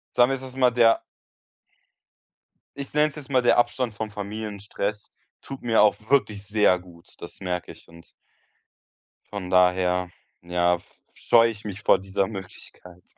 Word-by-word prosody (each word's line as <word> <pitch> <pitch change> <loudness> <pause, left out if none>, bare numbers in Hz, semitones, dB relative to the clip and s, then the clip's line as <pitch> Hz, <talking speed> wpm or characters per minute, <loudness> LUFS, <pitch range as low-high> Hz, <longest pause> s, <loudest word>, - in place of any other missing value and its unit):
Sagen 120 +1 +5
wir, - - +1
es 135 - -9
ist 130 -1 -10
mal 125 -2 +4
der 115 -1 +4 1.8
ich 140 - -6
nenne 150 +1 +3
es 140 - -12
jetzt 145 -2 -10
mal, 130 -2 +3
der 120 - +3
Abstand 120 -1 0
vom 110 0 -5
Familienstress 105 0 -5 0.3
tut 135 -1 -9
mir 115 -2 +3
auch 105 -2 +5 0.2
wirklich 105 -7 +2
sehr 105 -2 +3
gut, 90 -2 -17
das - - -9
merke 90 -2 -4
ich. - - -17
Und 85 0 -17 1.2
von 100 -3 -5
daher, 90 0 +2 0.3
ja, 90 0 +1
f 85 - -14 0.2
scheue 115 -1 +4
ich 105 -1 -12
mich 100 -1 -6
vor - - +4
dieser 95 0 -1
Möglichkeit. 90 -2 -11
105 Hz, 160 wpm, -24 LUFS, 90-120 Hz, 1.8 s, Sagen